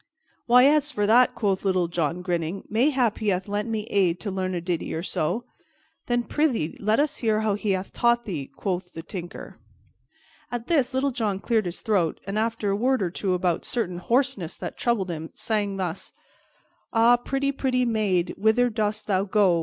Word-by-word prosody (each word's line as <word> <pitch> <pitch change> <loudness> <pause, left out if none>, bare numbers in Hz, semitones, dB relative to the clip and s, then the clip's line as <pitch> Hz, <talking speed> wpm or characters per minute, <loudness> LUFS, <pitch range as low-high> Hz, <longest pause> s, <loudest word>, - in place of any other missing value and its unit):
"Why, 250 +2 +7
as 295 +1 +4
for 205 -6 0
that," 240 +4 +5
quoth 195 -4 0
Little 185 -3 +2
John, 170 +1 -2
grinning, 175 +1 -2
"mayhap 245 0 +2
he 215 - -3
hath 185 -1 0
lent 205 +2 -2
me 220 -2 -1
aid 190 -5 +1
to 205 - -3
learn 185 -1 -2
a - - -1
ditty 170 -2 -3
or 165 - -3
so." 180 +6 -1 0.6
"Then, 240 -1 +1
prythee, 245 - 0
let 215 +3 +2
us 295 0 +1
hear 220 -2 +1
how 215 -1 +1
he 205 0 0
hath 185 +1 -4
taught 235 0 +2
thee," 155 -9 -4
quoth 180 +4 -4
the 165 - -7
Tinker. 175 -1 -8 0.9
At 240 -1 -4
this 275 -5 +1
Little 275 +1 +1
John 215 -6 -1
cleared 220 -3 +1
his 175 - -6
throat 195 -8 +1
and, 200 +2 -2
after 225 -2 -1
a - - +1
word 250 +2 +1
or 175 - -1
two 185 0 -1
about 180 -2 0
a - - -13
certain 185 -8 -2
hoarseness 235 - 0
that - - -6
troubled 210 -7 0
him, 160 -1 -5
sang 205 -3 -1
thus: 180 -3 -4 0.8
"_Ah, 240 +1 +4
pretty, 275 +1 0
pretty 255 -2 0
maid, 200 -6 +1
whither 230 +4 +3
dost 215 0 -1
thou 195 -2 +1
go? 195 -4 +3
210 Hz, 195 wpm, -25 LUFS, 180-240 Hz, 0.9 s, Why